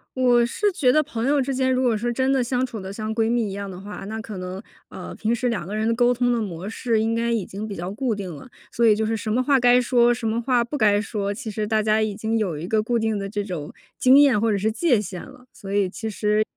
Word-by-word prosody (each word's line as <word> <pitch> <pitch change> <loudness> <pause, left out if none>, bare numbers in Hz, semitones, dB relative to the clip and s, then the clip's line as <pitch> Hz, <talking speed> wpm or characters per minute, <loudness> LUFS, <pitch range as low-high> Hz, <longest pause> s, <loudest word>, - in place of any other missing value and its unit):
我 245 -2 +4
是 405 - 0
觉 295 -9 +2
得 305 +3 +3
朋 240 -5 -3
友 290 +1 +3
之 270 0 -1
间 260 0 +1
如 255 0 +1
果 240 -3 +2
说 240 +3 -1
真 260 +3 +1
的 265 -2 +2
相 250 +1 0
处 235 -4 -7
得 190 0 -7
像 215 +2 -4
闺 225 0 +1
蜜 235 -3 0
一 - - -6
样 200 0 -5
的 185 -1 -8
话， 205 +2 -8
那 220 +2 -5
可 220 -3 -7
能， 185 +1 -6 0.3
呃， - - -8
平 220 +2 -1
时 245 +1 -1
两 225 -6 -3
个 205 - -4
人 215 +1 0
的 230 - +2
沟 245 +1 +3
通 245 0 +1
的 235 - 0
模 185 -3 -5
式 225 +1 -1
应 225 +1 0
该 230 +1 0
已 225 -5 0
经 205 +3 -6
比 205 - -6
较 175 +2 -5
固 230 +2 -1
定 190 -4 -6
了。 200 - -12 0.2
所 235 - -1
以 215 - +6
就 220 +1 -1
是 225 +1 0
什 220 0 -4
么 250 +4 +1
话 275 0 +3
该 245 0 +5
说， 240 -1 +3
什 240 -1 -2
么 225 +2 0
话 245 -1 +2
不 240 +5 -6
该 205 -4 +3
说， 205 -1 -3
其 215 +2 -6
实 210 0 -3
大 215 0 +1
家 215 0 +2
已 215 -2 -1
经 225 +2 -1
有 185 -8 -2
一 155 - -5
个 215 +2 +2
固 235 +2 0
定 220 -2 -1
的 195 0 -4
这 205 0 -3
种， 175 -7 -6 0.3
经 260 +1 +6
验 280 -7 +5
或 225 -1 +2
者 205 - +1
是 215 +3 0
界 245 0 +2
限 185 -3 -6
了， 250 - -15
所 195 - -9
以 200 -1 +2
其 220 +2 -5
实 210 +1 +1
220 Hz, 320 characters per minute, -23 LUFS, 205-245 Hz, 0.3 s, 以